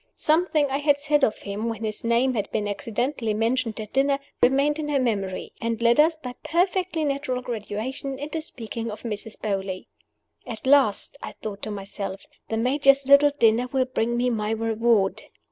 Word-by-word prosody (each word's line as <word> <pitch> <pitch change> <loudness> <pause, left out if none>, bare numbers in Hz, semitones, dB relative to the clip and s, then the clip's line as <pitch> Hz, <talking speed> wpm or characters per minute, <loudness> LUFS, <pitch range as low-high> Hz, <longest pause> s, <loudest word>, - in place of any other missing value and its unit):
Something 310 -1 +2
I 275 - 0
had 290 -1 +3
said 295 0 +2
of 215 - +2
him, 210 +3 -3
when 225 -1 -5
his 215 -1 -3
name 235 +3 +2
had 210 -4 -2
been 210 -1 -2
accidentally 230 +1 -2
mentioned 225 0 0
at 215 -1 -7
dinner, 275 +1 +3 0.2
remained 280 +4 +3
in 300 -1 -3
her 285 -2 +2
memory, 200 -7 -2
and 230 -1 -1
led 235 +3 +3
us, 320 +2 +5
by 255 -6 -7
perfectly 360 -1 0
natural 275 -3 -2
gradations, 245 +4 -4
into 305 +3 -4
speaking 230 -5 -6
of 210 - -8
Mrs. 215 -1 -5
Beauly. 195 -3 -3 0.6
"At 225 -1 -7
last," 275 -1 +3
I - - -7
thought 205 -2 -7
to - - -4
myself, 200 -1 -5 0.3
"the 225 - -1
Major's 275 +3 +3
little 280 +2 +7
dinner 230 +1 +3
will 265 -1 +2
bring 240 -2 -1
me 245 +1 +1
my 215 -2 -1
reward!" 225 -2 +1
240 Hz, 180 wpm, -25 LUFS, 215-280 Hz, 0.6 s, little